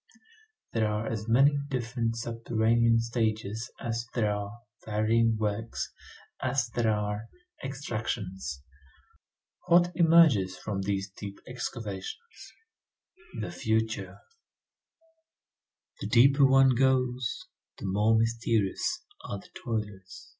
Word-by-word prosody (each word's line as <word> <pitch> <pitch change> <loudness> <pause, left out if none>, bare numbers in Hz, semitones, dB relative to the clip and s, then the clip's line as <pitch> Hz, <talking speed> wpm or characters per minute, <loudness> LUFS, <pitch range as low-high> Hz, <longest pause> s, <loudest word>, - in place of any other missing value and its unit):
There 110 -2 +2
are 105 +1 -1
as 110 -1 -3
many 140 +5 +5
different 120 -3 -2
subterranean 115 0 +2
stages 110 -1 -2
as 115 0 -3
there 105 -4 +2
are 105 +3 -6 0.2
varying 110 +1 +2
works, 110 +1 -3 0.5
as 130 -2 +1
there 115 -1 +1
are 105 +1 -2 0.4
extractions. 105 - -4 1.0
What 175 0 +5
emerges 160 - +5
from 100 -2 -3
these 100 0 -2
deep 100 0 -8
excavations? 120 - -6 0.9
The - - -4
future. 110 - -1 1.8
The - - -4
deeper 135 +3 +6
one 135 -1 +6
goes, 125 -1 +1 0.3
the - - -7
more 105 +4 +3
mysterious 115 - 0 0.2
are 100 - -4
the 100 - -14
toilers. 105 -5 -5
115 Hz, 100 wpm, -29 LUFS, 105-125 Hz, 1.8 s, deeper